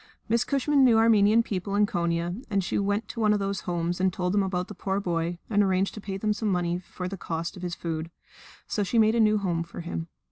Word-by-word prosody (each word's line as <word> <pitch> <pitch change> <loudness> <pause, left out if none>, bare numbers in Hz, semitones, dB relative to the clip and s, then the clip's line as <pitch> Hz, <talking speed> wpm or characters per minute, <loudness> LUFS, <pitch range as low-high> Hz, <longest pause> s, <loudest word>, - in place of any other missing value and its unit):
Miss 230 +2 +2
Cushman 280 +1 +2
knew 240 -3 +6
Armenian 225 0 +5
people 200 -1 -3
in 205 0 +4
Konia, 170 +3 -2
and 200 -2 +1
she 180 - -1
went 205 +2 0
to 230 - -6
one 215 -1 +4
of 210 - +1
these 195 0 -2
homes 175 +1 -1
and 190 0 +3
told 180 +1 -2
them 205 - +3
about 185 -1 -1
the 210 - -8
poor 195 0 -2
boy 170 -2 -2
and 205 -2 +2
arranged 190 -1 +1
to 210 - -8
pay 195 -1 -4
them 210 +2 0
some 210 0 -2
money 175 -1 0
for 180 0 -7
the 195 +1 -5
cost 165 +1 -4
of 180 - -10
his 175 -1 -3
food. 165 -1 -4 0.6
So 210 - -2
she 205 +4 0
made 220 0 +5
a 235 - +1
new 215 -1 +4
home 175 -5 -1
for 170 +1 -7
him. 170 -1 -5
195 Hz, 250 wpm, -27 LUFS, 175-215 Hz, 0.6 s, knew